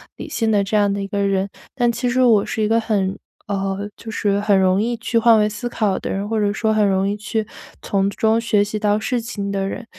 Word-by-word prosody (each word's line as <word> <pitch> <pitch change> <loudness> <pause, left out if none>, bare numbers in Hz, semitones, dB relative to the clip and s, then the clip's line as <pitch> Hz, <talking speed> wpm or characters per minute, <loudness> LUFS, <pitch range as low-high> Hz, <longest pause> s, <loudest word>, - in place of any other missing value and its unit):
理 - - -8
性 225 -2 -1
的 205 -2 +3
这 205 +2 0
样 205 -1 +3
的 200 - -3
一 195 - -4
个 200 0 -3
人。 195 0 0 0.3
但 240 -3 +2
其 245 +1 -2
实 255 +1 +1
我 225 -5 +4
是 220 - -2
一 210 - +2
个 230 +1 +3
很， 200 -4 -1 0.3
呃， 195 0 -2
就 225 - -10
是 205 -2 0
很 205 -1 +3
容 190 +1 +3
易 235 +1 -1
去 230 0 0
换 230 -1 +5
位 210 0 +2
思 225 +4 -5
考 210 -5 -1
的 - - -5
人， 200 +1 -2
或 225 - 0
者 205 -1 +1
说 220 0 0
很 210 -1 +3
容 195 0 +1
易 205 - -2
去 215 +1 -2 0.4
从 195 0 0
中 220 +2 +1
学 225 -3 +2
习 210 +1 -4
到 210 0 +2
事 240 +3 -1
情 210 -4 -5
的 195 -1 -1
人。 230 - -6
210 Hz, 275 characters per minute, -20 LUFS, 200-225 Hz, 0.4 s, 换